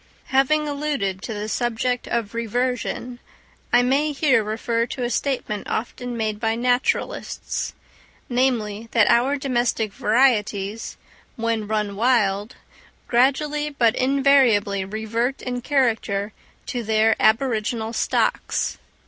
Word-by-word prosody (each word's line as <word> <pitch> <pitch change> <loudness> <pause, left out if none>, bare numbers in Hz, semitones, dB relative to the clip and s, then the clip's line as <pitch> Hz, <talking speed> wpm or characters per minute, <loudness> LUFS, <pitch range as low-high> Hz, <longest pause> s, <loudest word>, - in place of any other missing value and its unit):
Having 300 +3 +3
alluded 280 -10 -2
to 225 - -6
the 210 +1 -4
subject 240 +2 -1
of 230 -3 -2
reversion, 245 +1 -2 0.5
I 245 0 +5
may 285 +4 +1
here 270 -6 +3
refer 230 +2 -1
to 250 - -5
a 240 - -1
statement 240 -5 -2
often 245 +1 -4
made 215 -2 -2
by 225 0 0
naturalists—namely, 245 -1 -2
that 225 -3 +5
our 250 +5 +3
domestic 240 -5 0
varieties, 215 -3 +1 0.4
when 230 -2 -1
run 210 -2 -1
wild, 210 -2 +1 0.5
gradually 290 +4 +2
but 240 -6 +2
invariably 255 -7 +3
revert 220 +6 -2
in 250 -1 -3
character 225 -7 0 0.3
to 245 - -3
their 220 0 +3
aboriginal 225 -1 +1
stocks. - - 0
235 Hz, 110 wpm, -23 LUFS, 215-255 Hz, 0.5 s, I